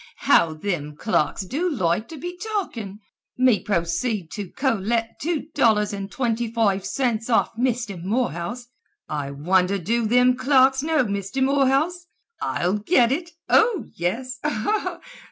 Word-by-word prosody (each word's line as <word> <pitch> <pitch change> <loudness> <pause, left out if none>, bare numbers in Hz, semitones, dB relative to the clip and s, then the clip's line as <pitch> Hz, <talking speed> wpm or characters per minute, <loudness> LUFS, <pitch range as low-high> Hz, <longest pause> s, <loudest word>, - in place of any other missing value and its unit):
"How 160 -2 +4
thim 155 -4 -3
clerks 190 0 0
do 310 - -1
loike 210 - 0
to 320 - -9
be 355 +4 -6
talkin'! 305 - -4 0.4
Me 255 -4 +4
proceed 175 +1 -1
to 200 -4 -5
collect 230 -2 -1
two 320 0 -1
dollars 210 -2 +3
and 200 0 -5
twinty 235 -3 -1
foive 205 -5 +1
cints 230 +2 -1
off 230 0 +3
Misther 235 -4 -1
Morehouse! 200 - -2 0.4
I 145 -2 -3
wonder 180 +7 +1
do 225 +5 0
thim 250 +2 +4
clerks 265 0 +4
know 310 -1 +2
Misther 200 +5 -2
Morehouse? 280 +6 +1 0.3
I'll 185 +4 0
git 240 - +3
it! 335 +5 -2 0.2
Oh, 440 -5 +3
yes! 250 +10 -3
230 Hz, 135 wpm, -23 LUFS, 195-265 Hz, 0.4 s, How